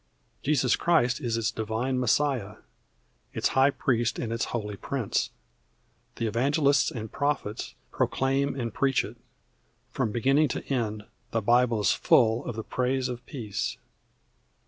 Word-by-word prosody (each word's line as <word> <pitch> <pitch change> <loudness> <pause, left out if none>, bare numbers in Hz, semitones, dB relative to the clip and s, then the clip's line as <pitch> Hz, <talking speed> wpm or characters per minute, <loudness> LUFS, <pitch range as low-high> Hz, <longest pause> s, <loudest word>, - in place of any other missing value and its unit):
Jesus 135 -4 +2
Christ 130 -8 +2
is 115 -2 -1
its 115 -2 0
Divine 110 +4 -2
Messiah, 125 -4 +1 0.8
its - - +1
high 135 +1 +4
priest 120 -4 0
and 115 -1 -3
its 115 - -1
holy 105 -3 -4
prince. 125 +1 -2 0.9
The 115 - -2
evangelists 140 +5 +2
and 110 -3 -6
prophets 140 -6 -2 0.2
proclaim 135 +1 0
and 115 -2 -3
preach 135 -2 +2
it. - - -10 0.7
From 110 - -1
beginning 135 +7 +3
to - - -4
end 110 -4 -1 0.3
the 115 - -1
Bible 120 0 +3
is - - +3
full 115 -1 +3
of 120 - -4
the 110 - -4
praise 130 +2 -1
of 125 0 -6
peace. 110 -8 -4
120 Hz, 140 wpm, -27 LUFS, 110-135 Hz, 0.9 s, high